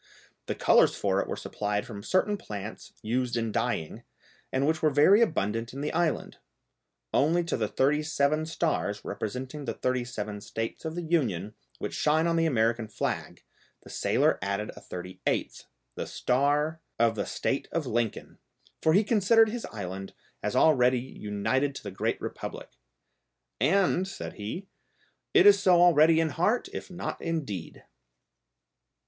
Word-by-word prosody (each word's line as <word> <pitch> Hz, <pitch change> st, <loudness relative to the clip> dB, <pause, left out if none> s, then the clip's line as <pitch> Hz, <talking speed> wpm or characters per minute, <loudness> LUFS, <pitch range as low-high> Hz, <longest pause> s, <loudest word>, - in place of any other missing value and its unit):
The -, -, -2 dB
colours -, -, +4 dB
for -, -, +1 dB
it -, -, -5 dB
were -, -, -3 dB
supplied 105 Hz, 0 st, -3 dB
from 105 Hz, -4 st, -8 dB
certain 185 Hz, -, +1 dB
plants 105 Hz, -, -8 dB
used 120 Hz, +2 st, -1 dB
in 115 Hz, -1 st, -1 dB
dyeing, 110 Hz, -9 st, -2 dB, 0.5 s
and 135 Hz, +1 st, +1 dB
which 160 Hz, +1 st, +1 dB
were 155 Hz, -, +4 dB
very 150 Hz, +10 st, +5 dB
abundant 115 Hz, -, 0 dB
in 135 Hz, -, -6 dB
the 150 Hz, -, -2 dB
island; 170 Hz, -2 st, -1 dB, 0.8 s
only 165 Hz, +5 st, +3 dB
to 170 Hz, -, -2 dB
the 110 Hz, -3 st, 0 dB
thirty 145 Hz, +7 st, +2 dB
seven 155 Hz, 0 st, +1 dB
stars, 155 Hz, -11 st, -1 dB
representing 130 Hz, +6 st, -5 dB
the -, -, -3 dB
thirty 125 Hz, -1 st, 0 dB
seven 105 Hz, -4 st, -5 dB
States 115 Hz, +8 st, -5 dB
of 160 Hz, 0 st, -3 dB
the 175 Hz, -, -3 dB
Union, 110 Hz, -, 0 dB, 0.2 s
which -, -, -5 dB
shine 155 Hz, +2 st, +2 dB
on 170 Hz, 0 st, +1 dB
the 165 Hz, 0 st, +3 dB
American 115 Hz, -4 st, +1 dB
flag, 105 Hz, -, -4 dB, 0.4 s
the -, -, -12 dB
sailor -, -, +2 dB
added 100 Hz, +2 st, -2 dB
a -, -, -11 dB
thirty 90 Hz, +1 st, -8 dB
eighth, -, -, -1 dB, 0.3 s
the -, -, -5 dB
star 145 Hz, +5 st, +1 dB, 0.2 s
of 115 Hz, -1 st, +3 dB
"the 110 Hz, -, -3 dB
State -, -, -2 dB
of -, -, -1 dB
Lincoln," 115 Hz, -1 st, -2 dB, 0.4 s
for 160 Hz, -, +3 dB
he 200 Hz, +5 st, +5 dB
considered 220 Hz, +1 st, +4 dB
his 235 Hz, +1 st, -4 dB
island 95 Hz, -2 st, -7 dB, 0.3 s
as -, -, -2 dB
already 125 Hz, -5 st, +5 dB
united 130 Hz, +3 st, -2 dB
to -, -, -8 dB
the 100 Hz, -, -6 dB
great 95 Hz, -, -1 dB
republic. -, -, -6 dB, 0.9 s
"And," 190 Hz, 0 st, +2 dB
said 195 Hz, -, -7 dB
he, 110 Hz, -, -6 dB, 0.7 s
"it -, -, +7 dB
is 205 Hz, -1 st, +8 dB
so 185 Hz, -3 st, +5 dB
already 165 Hz, -2 st, +6 dB
in 165 Hz, -1 st, +2 dB
heart, 180 Hz, -, 0 dB
if -, -, -6 dB
not 175 Hz, -1 st, -5 dB
in 165 Hz, -3 st, -2 dB
deed!" 95 Hz, -8 st, -7 dB
140 Hz, 160 wpm, -28 LUFS, 110-165 Hz, 0.9 s, is